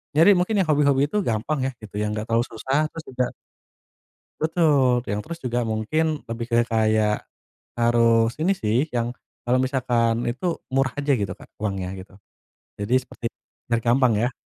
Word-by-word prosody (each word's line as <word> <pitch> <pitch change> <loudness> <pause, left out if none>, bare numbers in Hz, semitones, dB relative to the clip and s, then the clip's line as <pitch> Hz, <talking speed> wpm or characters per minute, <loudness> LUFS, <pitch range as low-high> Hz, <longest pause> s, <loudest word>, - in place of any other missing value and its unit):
nyari 165 +7 +7
mungkin 190 +4 +1
yang 180 - +2
hobi-hobi 140 -1 +3
itu 210 - -1
gampang, 130 +5 -1
ya, - - -3
gitu. 105 -2 -12
Yang 105 0 0
nggak - - -6
terlalu 115 +2 +3
susah, 135 +7 0
terus 165 - -8
juga 125 -1 -1 1.1
Betul. 145 -7 +3
Te - - -4
yang 105 - -1
terus 165 +8 -7
juga 120 0 0
mungkin 150 +8 -1
lebih 115 +1 -5
ke 115 - +1
kayak, 110 -2 +1 0.5
harus 115 -1 +3
ini 180 +5 +3
sih, 115 +6 0
yang 120 -2 -2 0.3
kalau 125 +1 +2
misalkan 120 -3 +1
itu 165 +8 -2 0.2
murah 135 -1 +2
aja, 145 0 +1
gitu 100 -7 0
Kak. - - -15
Uangnya, 95 -3 -2
gitu. 95 +1 -14 0.6
Jadi 105 +5 -1
seperti 125 -2 -8 0.4
biar 115 -1 +1
gampang, 125 0 +3
ya. 125 +1 0
120 Hz, 170 wpm, -24 LUFS, 115-145 Hz, 1.1 s, nyari